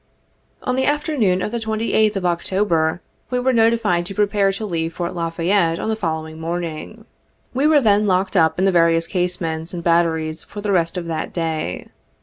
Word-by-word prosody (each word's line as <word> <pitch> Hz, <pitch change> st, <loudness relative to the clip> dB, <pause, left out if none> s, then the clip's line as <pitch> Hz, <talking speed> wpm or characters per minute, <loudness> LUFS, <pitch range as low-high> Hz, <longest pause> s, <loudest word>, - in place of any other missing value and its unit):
47 -, -, -5 dB
On 250 Hz, -, +2 dB
the 265 Hz, 0 st, +1 dB
afternoon 275 Hz, -, 0 dB
of -, -, -3 dB
the 235 Hz, -, -2 dB
28th 220 Hz, -1 st, +1 dB
of 190 Hz, -2 st, -2 dB
October, 175 Hz, -2 st, 0 dB, 0.3 s
we 250 Hz, -, 0 dB
were 260 Hz, +1 st, +1 dB
notified 225 Hz, -6 st, +2 dB
to 195 Hz, -, -7 dB
prepare 200 Hz, -1 st, +2 dB
to 195 Hz, +3 st, -4 dB
leave 165 Hz, -4 st, -3 dB
Fort 175 Hz, -1 st, -3 dB
La 170 Hz, -1 st, -2 dB
Fayette 170 Hz, 0 st, +1 dB
on 220 Hz, -, -3 dB
the 220 Hz, -, +1 dB
following 160 Hz, -5 st, -4 dB
morning. 170 Hz, +5 st, -5 dB, 0.5 s
We 270 Hz, +4 st, +2 dB
were 305 Hz, -2 st, +5 dB
then 210 Hz, -2 st, +3 dB
locked 190 Hz, +1 st, +1 dB
up 160 Hz, -3 st, +3 dB
in 190 Hz, -, +2 dB
the 195 Hz, -, +4 dB
various 165 Hz, -1 st, +3 dB
casemates 175 Hz, -2 st, -2 dB
and 170 Hz, -, -5 dB
batteries 165 Hz, -2 st, +1 dB
for 205 Hz, -, -9 dB
the 205 Hz, 0 st, -2 dB
rest 170 Hz, -1 st, +1 dB
of 175 Hz, -, -3 dB
that 160 Hz, -2 st, -3 dB
day. 160 Hz, -, -3 dB
180 Hz, 195 wpm, -20 LUFS, 165-215 Hz, 0.5 s, were